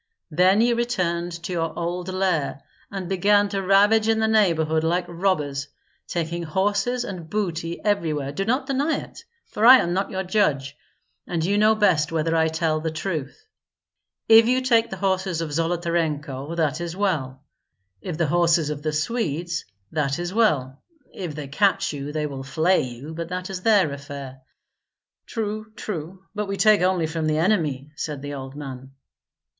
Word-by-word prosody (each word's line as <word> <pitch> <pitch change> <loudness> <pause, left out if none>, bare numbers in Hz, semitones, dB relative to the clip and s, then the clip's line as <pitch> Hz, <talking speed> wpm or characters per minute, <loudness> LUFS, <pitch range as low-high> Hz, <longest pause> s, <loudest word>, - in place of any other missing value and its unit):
Then 185 +6 +4
you 240 +1 +3
returned 180 -8 -1
to 180 - -4
your 165 -2 -2
old 175 +1 -3
lair, 185 -7 -1 0.3
and 195 -3 -5
began 205 +2 +3
to 200 -1 -2
ravage 205 +3 +4
in 225 0 +3
the 220 0 +2
neighborhood 165 -8 +2
like 175 +2 +1
robbers, 155 -6 -1 0.4
taking 170 0 -2
horses 205 +8 0
and 175 -5 -7
booty 170 -5 -2
everywhere. 155 -9 0
Do 160 +7 -2
not 250 +7 0
deny 280 +3 0
it, - - -9 0.2
for 210 - -4
I 255 +3 +10
am 175 -8 0
not 195 +2 -1
your 190 0 -3
judge, 150 -8 0 0.5
and 165 -2 -1
you 200 +3 +1
know 215 +1 +5
best 180 -8 +2
whether 165 0 0
I 160 0 +3
tell 160 -1 0
the 160 +1 -2
truth. 160 - -5 0.8
If 225 0 +8
you 255 +1 +2
take 235 -3 +3
the 190 - -6
horses 190 -2 0
of 160 -3 -3
Zolotarenko, 165 -3 -1
that 155 -1 0
is 170 +1 -5
well; 145 -9 -1 0.6
if 170 -4 -5
the 170 - +2
horses 165 -1 +2
of 145 -1 -5
the 155 0 -2
Swedes, 170 - -2 0.3
that 140 -3 0
is 175 +1 -4
well. 145 - +1 0.3
If 175 -6 -5
they 150 -2 -6
catch 190 +8 +1
you 145 0 -5
they 155 0 -2
will 140 -2 -5
flay 160 +7 +2
you; 130 +4 -7
but 165 +1 -5
that 185 +1 -4
is 185 -1 -5
their 200 -7 +4
affair." 140 -2 -8 0.9
"True, 215 -1 -4
true; 185 -3 -6
but 210 -1 -3
we 195 0 -3
take 215 -2 +5
only 180 -2 +2
from 160 0 -2
the 155 0 +1
enemy," 155 -6 0
said 145 -2 -5
the 145 0 -5
old 135 -1 -7
man. 135 -2 -8
170 Hz, 170 wpm, -24 LUFS, 150-200 Hz, 0.9 s, I